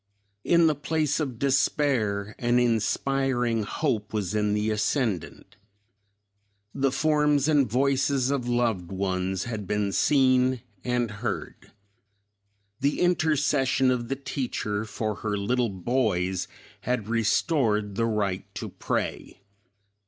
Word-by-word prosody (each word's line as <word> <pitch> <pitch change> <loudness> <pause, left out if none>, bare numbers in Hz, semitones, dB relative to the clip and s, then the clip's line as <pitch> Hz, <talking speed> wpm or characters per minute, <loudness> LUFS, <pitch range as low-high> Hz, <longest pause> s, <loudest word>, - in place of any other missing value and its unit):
In 170 -1 +4
the 155 - +4
place 150 +1 -1
of 135 -6 -3
despair 130 -6 +1
an 120 0 +2
inspiring 120 +1 +1
hope 105 -1 -2
was 105 -2 -2
in 105 -1 +1
the 105 +1 0
ascendant. 105 - -2 1.2
The 135 -1 +1
forms 150 0 +2
and 145 -6 +3
voices 135 +1 +1
of 130 -4 -1
loved 115 -8 0
ones 95 -1 -1
had 110 -5 -5
been 105 0 0
seen 130 -1 +3 0.2
and 125 -2 0
heard. 105 - -5 1.1
The 140 +2 0
intercession 145 -6 +2
of 120 -2 -1
the 135 - -1
teacher 120 -6 -3
for 110 -1 -3
her 105 -1 -2
little 120 +4 0
boys 95 -3 -1 0.3
had 125 -4 -2
restored 110 -2 +1
the 115 +3 0
right 100 -4 -1
to - - -5
pray. - - -4
120 Hz, 115 wpm, -26 LUFS, 105-135 Hz, 1.2 s, In